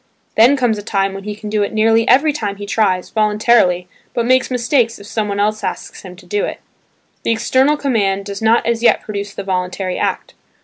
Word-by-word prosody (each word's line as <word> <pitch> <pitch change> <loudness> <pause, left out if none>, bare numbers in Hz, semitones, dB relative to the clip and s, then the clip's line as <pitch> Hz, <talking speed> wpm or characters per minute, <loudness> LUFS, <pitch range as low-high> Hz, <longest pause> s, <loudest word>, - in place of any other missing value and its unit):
Then 245 +6 +5
comes 235 -5 0
a - - -5
time 195 -2 -1
when 195 0 -8
he 210 -1 -4
can 210 0 -9
do 210 0 0
it 205 - -2
nearly 225 +1 +3
every 290 +5 +4
time 205 -8 -3
he 205 0 -8
tries 200 -3 0
voluntarily 210 -4 +2 0.3
but 235 - 0
makes 255 +1 +2
mistakes 240 -1 +1
if 200 - -13
someone 210 -2 -3
else 215 +1 0
asks 185 - -5
him 185 -2 -11
to 180 0 -17
do 205 +3 -1
it. - - -4 0.6
The - - -1
external 260 +6 +2
command 200 -8 0
does 200 0 -6
not 225 +1 +3
as 230 0 0
yet 240 - +4
produce 200 -1 -6
the 200 - -5
voluntary 185 0 -3
act. - - -2
215 Hz, 210 wpm, -17 LUFS, 200-230 Hz, 0.6 s, Then